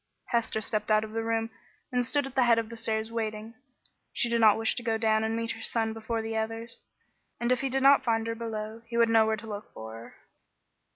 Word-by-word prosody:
Hester 230 -2 0
stepped 215 0 -1
out 215 0 +4
of 215 - -7
the 225 +1 -2
room 225 0 -1 0.4
and 250 -1 +1
stood 285 +3 +1
at 270 - -8
the 265 - +2
head 235 -1 +5
of 225 -1 -1
the 230 - -7
stairs 220 0 -1
waiting. 220 -1 -4 0.6
She 240 - 0
did 235 0 +1
not 215 -2 +7
wish 225 0 +2
to - - -1
go 225 -1 0
down 220 -1 +2
and 220 0 -1
meet 230 0 -2
her - - -7
son 225 -1 0
before 225 0 -3
the 225 0 -4
others, 225 +1 -3 0.6
and 235 +1 0
if 255 - +2
he 270 - -1
did 265 +1 0
not 275 0 +7
find 225 -2 +1
her 230 - -1
below, 220 -1 -5
he 235 0 -4
would 230 -1 +5
know 225 -1 +5
where 220 0 +1
to 220 - -10
look 210 -1 -7
for 110 0 -8
her. 115 +1 -11
225 Hz, 245 wpm, -28 LUFS, 220-235 Hz, 0.6 s, not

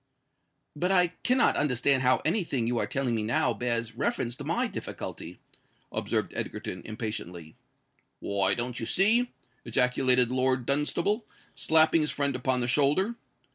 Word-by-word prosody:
"But 180 +5 -1
I 180 -2 +4
cannot 255 +1 +3
understand 135 -1 +2
how 130 0 +3
any 180 +6 +1
thing 130 -8 -2
you 120 0 0
are - - 0
now - - -13
telling 135 -3 -1
me 110 -2 -2 0.3
bears 115 -2 -2
reference 120 -1 -2
to - - -7
my - - 0
difficulty," 85 +2 -7 0.5
observed - - -1
Egerton, 90 - -4
impatiently. 100 -8 -6 0.6
"Why—don't 100 +5 -1
you 115 - -4
see!" 230 +6 +2 0.3
ejaculated 125 +1 +3
Lord 130 -1 +1
Dunstable, 170 - 0 0.3
slapping 160 0 +4
his 150 - 0
friend 140 -2 -1
upon 125 0 0
the 120 - -1
shoulder. 150 - +2
130 Hz, 140 wpm, -28 LUFS, 115-155 Hz, 0.6 s, I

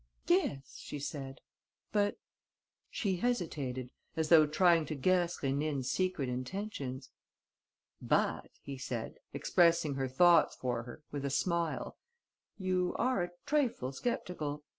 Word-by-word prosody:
"Yes," 145 -7 0
she - - -6
said, 135 -1 -6 0.5
"but...." 205 -1 +1 0.7
She 195 -4 -1
hesitated, 145 - -2 0.3
as 160 -1 0
though 155 -3 +8
trying 165 0 +4
to 155 - -3
guess 175 +4 +2
Rénine's 140 -1 0
secret 185 -7 0
intentions. 130 -1 -4 0.9
"But," - - +1
he 140 -2 -6
said, 120 -3 -4
expressing 170 -4 +3
her 135 -1 -1
thoughts 170 +5 +5
for 125 -2 -2
her, 120 +5 -10
with 145 -1 -4
a 140 - 0
smile, 170 +3 -1 0.6
"you 185 -2 0
are 255 -6 +2
a 175 - -2 0.2
trifle 265 - +1
sceptical. 150 - -3
155 Hz, 120 wpm, -33 LUFS, 135-180 Hz, 0.9 s, though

